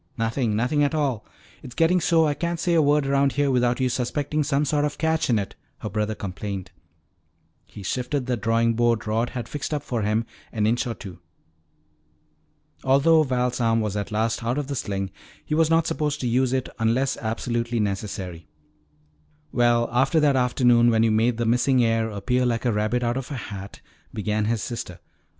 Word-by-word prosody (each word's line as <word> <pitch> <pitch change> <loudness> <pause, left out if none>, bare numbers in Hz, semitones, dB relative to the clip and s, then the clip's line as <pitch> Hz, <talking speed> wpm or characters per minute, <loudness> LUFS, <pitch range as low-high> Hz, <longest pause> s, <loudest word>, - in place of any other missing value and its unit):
"Nothing, 115 0 0
nothing 125 +7 +1
at 145 +2 +1
all. 135 -8 -1 0.3
It's 125 - -10
getting 170 +2 +3
so 165 -1 +3
I 150 - +1
can't 170 +2 -3
say 170 +1 +1
a 165 - +5
word 145 0 +3
around 140 0 +2
here 145 -1 +1
without 125 -1 +2
you 130 - +2
suspecting 140 +5 -1
some 145 0 +1
sort 145 +1 +1
of 150 -1 -1
a - - -27
catch 160 -1 0
in 115 - +3
it," 100 -2 -3 0.2
her 105 - -6
brother 105 +2 -1
complained. 100 -1 -5 1.0
He 105 - -11
shifted 125 - -2
the 125 -1 0
drawing 115 +1 +1
board 120 -1 +1
Rod 115 +3 0
had 120 -2 -5
fixed 145 +1 -3
up 145 - -3
for 120 -5 -2
him 105 +2 0 0.3
an 105 -2 0
inch 120 +4 +1
or 115 - -3
two. 95 -5 -10 1.6
Although 145 +5 +5
Val's 125 -3 0
arm 115 -1 +2
was 105 -2 -2
at 100 0 -3
last 110 +2 -1
out 120 +4 -1
of 145 - -1
the 140 +1 -4
sling, 95 -5 -3 0.3
he - - -3
was 160 0 +3
not 165 0 +3
supposed 150 -3 -1
to 125 - -1
use 125 +2 +2
it 130 -1 -1
unless 115 +4 +1
absolutely 115 +1 -2
necessary. 95 -5 -4 1.0
"Well, 120 -1 +3
after 135 +6 +3
that 145 -3 +3
afternoon 120 -2 +4
when 115 -1 +3
you 115 - +3
made 115 +2 +2
the 120 - -1
missing 125 +2 +3
heir 115 0 +1
appear 125 +5 0
like 120 -1 0
a 120 - +3
rabbit 110 +4 0
out 120 +1 0
of 135 -2 -5
a 145 - -4
hat 100 -4 -8 0.2
" - - -35
began 105 0 -1
his 110 0 -1
sister. 115 -8 -6
120 Hz, 200 wpm, -24 LUFS, 110-140 Hz, 1.6 s, a